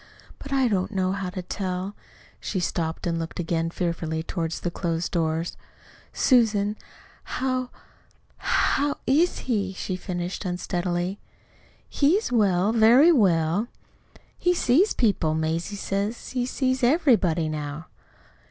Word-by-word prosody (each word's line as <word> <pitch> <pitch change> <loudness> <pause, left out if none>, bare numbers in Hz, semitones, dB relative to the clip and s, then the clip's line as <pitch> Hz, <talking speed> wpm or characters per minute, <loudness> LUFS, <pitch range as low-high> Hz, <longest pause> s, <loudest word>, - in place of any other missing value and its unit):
But 280 - -9
I 270 -2 +3
don't 190 -5 0
know 190 -3 0
how 195 -1 -3
to 185 0 -6
tell 185 +2 -4 0.2
" - - -26
She 190 - -2
stopped, 165 -2 -2
and 170 -1 -1
looked 165 +1 -5
again 165 -1 -1
fearfully 165 -2 -2
toward 165 -1 -3
the 175 - -3
closed 170 -1 -2
doors. 165 0 -1 0.6
"Susan, 215 -5 +3 0.5
how 255 -1 -2 0.7
how 285 +1 +1
IS 320 +7 +2
he?" 200 -6 -1
she 185 0 -4
finished 180 0 -4
unsteadily. 180 0 -2 0.7
"He's 315 - +2
well 200 -4 +3
very 235 +8 +6
well." 185 - +2 0.7
"He 355 0 +2
sees 335 - +3
people 190 -9 +1
Mazie 165 +5 -2
says 200 +3 -3
he 250 -1 -1
sees 260 0 0
everybody 240 - +3
now." 150 0 -5
190 Hz, 125 wpm, -25 LUFS, 170-245 Hz, 0.7 s, very